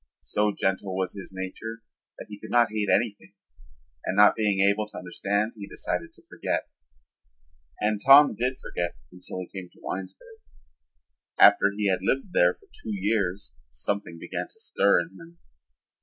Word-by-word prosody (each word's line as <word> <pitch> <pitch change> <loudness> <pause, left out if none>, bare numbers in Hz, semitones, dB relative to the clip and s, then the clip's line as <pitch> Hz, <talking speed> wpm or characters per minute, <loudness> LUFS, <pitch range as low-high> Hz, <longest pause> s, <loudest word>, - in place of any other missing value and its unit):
So 105 0 +1
gentle 95 -1 -1
was 95 -1 -1
his 100 -2 -8
nature 95 +5 -6 0.3
that - - -8
he 105 -1 -10
could - - -10
not 120 -2 +4
hate 105 -2 -1
anything 110 -4 0 0.7
and 95 - -2
not 105 0 +7
being 105 -3 +1
able 100 +2 +2
to 105 - -11
understand 100 +4 -1
he 100 -2 -8
decided - - -3
to - - -19
forget. - - -3 1.1
And 105 0 0
Tom 140 +1 +8
did 125 +4 -1
forget 85 -1 -4 0.2
until 90 0 -8
he - - -5
came 90 -1 -9
to - - -22
Winesburg. 95 - -7 1.0
After 100 - +7
he 105 -1 0
had 95 -1 +2
lived 135 - -1
there 90 0 +4
for - - -25 0.2
two 110 - -4
years 100 -5 -1 0.2
something 85 +8 -4
began - - -5
to 445 - -19
stir 100 - +3
in 85 - -7
him. 170 +1 -14
100 Hz, 165 wpm, -26 LUFS, 95-110 Hz, 1.1 s, Tom